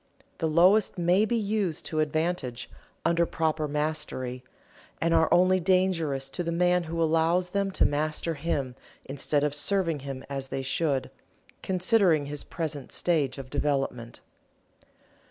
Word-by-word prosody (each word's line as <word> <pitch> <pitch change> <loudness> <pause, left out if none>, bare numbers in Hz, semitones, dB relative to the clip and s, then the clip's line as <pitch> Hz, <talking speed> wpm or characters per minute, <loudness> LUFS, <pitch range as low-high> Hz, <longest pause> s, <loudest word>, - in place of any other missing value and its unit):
The 165 - +1
lowest 185 +8 +4
may 180 +4 +3
be 235 - -1
used 205 -6 -1
to 155 - -2
advantage, 155 -5 -2 0.3
under 170 0 +3
proper 155 -1 -1
mastery, 150 -4 -3 0.6
and 165 0 +1
are 160 -1 +3
only 185 +1 +4
dangerous 170 -7 +1
to 135 - -4
the 170 -1 -2
man 180 +1 +2
who 165 +1 -4
allows 165 +2 +2
them 200 +1 0
to 190 - +1
master 155 +3 -1
him 140 -4 -2 0.3
instead 145 +1 -1
of 150 -1 0
serving 165 0 0
him 135 -1 -7
as 135 -1 -4
they 135 0 -4
should, 140 -1 -1 0.5
considering 185 -4 +2
his 145 0 -5
present 150 -5 -5
stage 145 -7 0
of 135 -1 -9
development. 135 -5 -2
160 Hz, 140 wpm, -27 LUFS, 145-180 Hz, 0.6 s, lowest